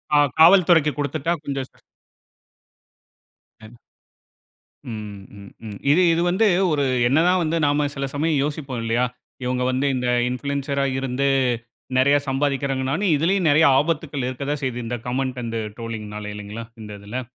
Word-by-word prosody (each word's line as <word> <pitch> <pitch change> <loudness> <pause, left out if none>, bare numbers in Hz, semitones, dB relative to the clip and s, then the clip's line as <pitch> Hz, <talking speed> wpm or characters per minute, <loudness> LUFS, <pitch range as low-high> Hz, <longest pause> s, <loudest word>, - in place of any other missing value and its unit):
ஆ. - - +6 0.2
காவல்துறைக்கு 165 -3 +6
கொடுத்துட்டா, 145 +4 -1
கொஞ்சம் 135 -2 -4 1.9
ஆ. 110 - -11 1.2
ம். 105 -2 -7 0.2
ம். 100 -1 -12
ம். 105 -2 -7
இது, 175 - +4
இது 170 - +1
வந்து 210 +5 +3 0.2
ஒரு, 145 -2 +1 0.2
என்ன 140 +5 +3
தான் 180 0 +3
வந்து 165 +1 0
நாம 145 0 +2
சில 140 0 -2
சமயம் 150 -1 +1
யோசிப்போம், 140 -4 -4
இல்லையா. 115 +2 +1 0.4
இவங்க 125 0 -1
வந்து, 130 +2 0
இந்த 125 -1 -2 0.2
இன்ஃப்ளூயன்சரா 140 +1 -2
இருந்து, 135 +1 -1 0.7
நெறைய 140 +2 +4
சம்பாதிக்கிறாங்கன்னு, 135 -1 -1
ஆனா, 200 +4 0
இதிலேயும் 175 +4 +1
நெறைய 155 +3 +5
ஆபத்துக்கள் 150 -3 -2
இருக்கத்தான் 140 +3 -3
செய்தது. 125 -2 -3
இந்த 120 +1 -3
கமெண்ட் 130 0 -2
அண்ட் 115 0 -4 0.2
ட்ரோலிங்னால. 105 -2 -6
இல்லைங்களா, 105 +2 -7 0.2
இந்த 105 -1 -9
இதில. 110 +6 -5
135 Hz, 140 wpm, -22 LUFS, 125-150 Hz, 1.9 s, ஆ